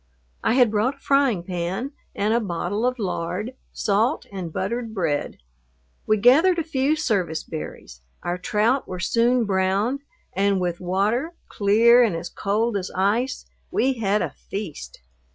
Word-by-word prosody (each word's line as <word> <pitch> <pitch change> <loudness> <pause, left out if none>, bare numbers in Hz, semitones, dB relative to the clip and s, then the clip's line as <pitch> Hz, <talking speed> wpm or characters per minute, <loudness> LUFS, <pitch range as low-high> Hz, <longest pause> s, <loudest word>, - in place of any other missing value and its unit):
I - - +2
had 250 -4 +5
brought 220 +6 +1
a - - -27
frying 275 -10 +2
pan 185 +8 -3 0.2
and 210 +2 +1
a 235 - +3
bottle 205 +3 -1
of 255 0 -1
lard, 200 +2 -3 0.2
salt, 220 +8 +1
and 180 -4 -5
buttered 225 +6 -3
bread. 160 -7 -1 0.7
We 215 - +4
gathered 310 - +5
a 330 - 0
few 290 -1 +1
service 195 - -1
berries, 65 - -8 0.2
our 175 +1 -2
trout 220 +8 +1
were 185 - -5
soon 235 +4 +2
browned, 195 +6 +1 0.3
and 200 0 +2
with 175 -1 -2
water, 210 - 0 0.2
clear, 225 +4 +5
and 225 -8 +2
as 170 +1 -5
cold 215 +2 0
as 190 -1 -4
ice, 220 +7 0 0.2
we 265 +1 +1
had 210 -1 +1
a - - -3
feast. 195 - -7
210 Hz, 150 wpm, -23 LUFS, 185-245 Hz, 0.7 s, had